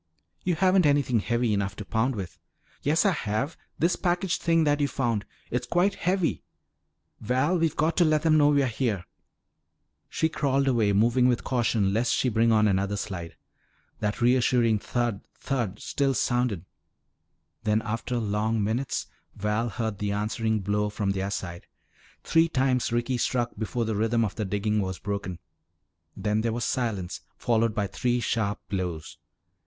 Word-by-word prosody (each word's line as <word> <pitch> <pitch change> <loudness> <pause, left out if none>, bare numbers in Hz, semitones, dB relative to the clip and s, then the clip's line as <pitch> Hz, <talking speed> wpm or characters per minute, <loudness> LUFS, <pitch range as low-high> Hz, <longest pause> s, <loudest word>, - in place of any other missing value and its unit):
"You 175 -2 +1
haven't 185 -1 +4
anything 140 -5 +2
heavy 120 +1 0
enough 100 -1 -1
to 105 - -7
pound 120 +5 0
with." 95 -4 -6 0.4
"Yes, 155 +8 +2
I 200 - +5
have. 135 - -2 0.2
This 170 +3 +2
package 180 0 0
thing 165 -1 +3
that 145 -1 +2
you 145 - +3
found. 115 -7 -1 0.2
It's 125 0 -2
quite 180 +7 +2
heavy. 180 -1 0 0.8
Val, 130 - +1
we've 165 -1 +1
got 160 +2 +1
to 175 - +5
let 155 -1 +2
them 160 -1 +4
know 145 -1 +5
we're 140 -2 +3
here!" 110 -6 -1 1.0
She 160 - +1
crawled 140 -3 0
away, 115 -6 +3
moving 120 +5 +3
with 125 -2 +1
caution 115 -6 +1
lest 115 +3 +2
she 130 - +1
bring 115 0 +3
on 110 -1 +4
another 100 +1 0
slide. 90 -5 -5 0.6
That 105 +3 -2
reassuring 120 -2 +3
thud, 120 -2 -2
thud 120 -7 -2
still 135 -2 0
sounded. 120 -8 0 1.0
Then, 110 0 +1
after 115 +2 -2
long 110 0 0
minutes, 115 +6 -1 0.3
Val 105 +3 -1
heard 110 -3 -3
the 100 -1 -1
answering 110 +1 -1
blow 105 +2 0
from 105 -1 -1
their 95 0 -2
side. 85 -3 -5 0.6
Three 165 0 +3
times 130 -4 +1
Ricky 120 +1 0
struck 120 0 0
before 115 +2 -2
the 110 -1 -1
rhythm 115 +2 +2
of 100 - -4
the 110 - -3
digging 105 +2 0
was 95 -1 -3
broken. 100 -3 -4 0.8
Then 105 0 0
there 115 0 0
was 120 0 -2
silence 105 -8 -2 0.2
followed 115 -2 +1
by 105 -3 0
three 120 +5 0
sharp 110 -3 -1
blows. 90 -5 -4
115 Hz, 160 wpm, -27 LUFS, 105-130 Hz, 1.0 s, I